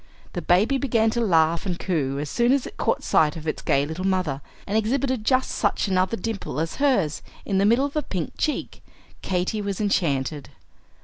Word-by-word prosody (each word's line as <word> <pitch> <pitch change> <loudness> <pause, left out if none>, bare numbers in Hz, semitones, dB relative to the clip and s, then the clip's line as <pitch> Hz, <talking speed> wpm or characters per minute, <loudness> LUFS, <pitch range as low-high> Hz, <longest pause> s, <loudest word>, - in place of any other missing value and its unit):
The - - -3
baby 210 +10 +3
began 225 -5 +2
to 235 - -1
laugh 165 -5 +3
and 175 -2 -2
coo 145 -8 -1
as 145 +1 -3
soon 240 - +2
as 275 -2 +1
it - - -9
caught - - 0
sight 150 -1 +3
of 160 0 -8
its 155 - -2
gay 140 +1 +2
little 160 +5 -5
mother, 180 -8 0 0.2
and 200 - -3
exhibited 255 +2 0
just 255 +3 +2
such 205 0 0
another 190 +3 +1
dimple 200 -6 -4
as 160 +1 -2
hers, 245 - +1 0.2
in 195 -1 +1
the 200 - +3
middle 235 +6 +4
of 285 - -6
a 305 - +2
pink 185 - -4
cheek. 305 - -3 0.4
Katy 185 +3 -1
was 200 -2 -3
enchanted. 150 -8 0
195 Hz, 195 wpm, -24 LUFS, 160-230 Hz, 0.4 s, middle